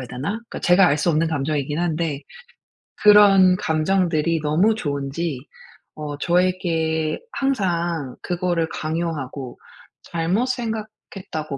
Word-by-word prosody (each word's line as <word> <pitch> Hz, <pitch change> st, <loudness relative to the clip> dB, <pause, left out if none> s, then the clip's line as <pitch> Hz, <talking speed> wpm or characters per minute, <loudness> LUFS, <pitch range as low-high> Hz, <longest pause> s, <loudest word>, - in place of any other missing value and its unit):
해야 125 Hz, -, -8 dB
되나? 130 Hz, +7 st, -5 dB
그러니까 230 Hz, +2 st, -7 dB
제가 180 Hz, +1 st, +5 dB
알 145 Hz, -, +1 dB
수 160 Hz, -, 0 dB
없는 160 Hz, +1 st, +1 dB
감정이긴 145 Hz, 0 st, -2 dB
한데 160 Hz, -4 st, -1 dB, 0.8 s
그런 200 Hz, -3 st, +7 dB
감정들이 165 Hz, -1 st, 0 dB
너무 175 Hz, +9 st, +2 dB
좋은지 140 Hz, -, -3 dB, 0.6 s
어 150 Hz, -2 st, -6 dB
저에게 165 Hz, -2 st, 0 dB
항상 175 Hz, -, -1 dB
그거를 175 Hz, -2 st, -1 dB
강요하고 155 Hz, -5 st, -4 dB, 0.5 s
잘못 175 Hz, +9 st, -1 dB
생각했다고 215 Hz, -, -5 dB
165 Hz, 265 characters per minute, -22 LUFS, 150-185 Hz, 0.8 s, 그런